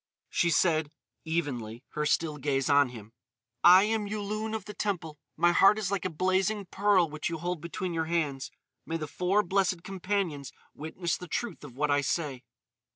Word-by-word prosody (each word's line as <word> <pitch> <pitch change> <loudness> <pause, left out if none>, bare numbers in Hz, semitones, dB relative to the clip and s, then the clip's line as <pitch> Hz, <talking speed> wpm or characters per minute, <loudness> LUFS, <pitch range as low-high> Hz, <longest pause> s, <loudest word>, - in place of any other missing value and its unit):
She 170 - +2
said, 160 -3 +2 0.3
evenly, 130 -8 -3
her 150 0 -2
still 155 -1 0
gaze 135 0 0
on 140 -2 +5
him: 115 -2 -11 0.5
"I 180 +2 +9
am 215 -1 0
Yulun 215 +1 -3
of 215 -3 -5
the 210 - -8
Temple. 165 -9 -3 0.2
My 175 - +4
heart 195 +4 +6
is 205 -3 -2
like 200 -2 -1
a - - +1
blazing 190 +5 0
pearl 190 -2 +3
which 150 0 -4
you 165 - -3
hold 175 0 -3
between 175 +2 -4
your 160 -1 -1
hands. 155 -5 -1 0.3
May 165 - -3
the 155 - -4
four 185 +6 +1
Blessed 185 -2 0
Companions 185 -6 -2 0.2
witness 160 +2 -3
the 180 - -9
truth 235 +1 -4
of 135 -5 -11
what 150 +2 0
I 145 0 +3
say." 140 -2 -2
170 Hz, 180 wpm, -29 LUFS, 150-195 Hz, 0.5 s, I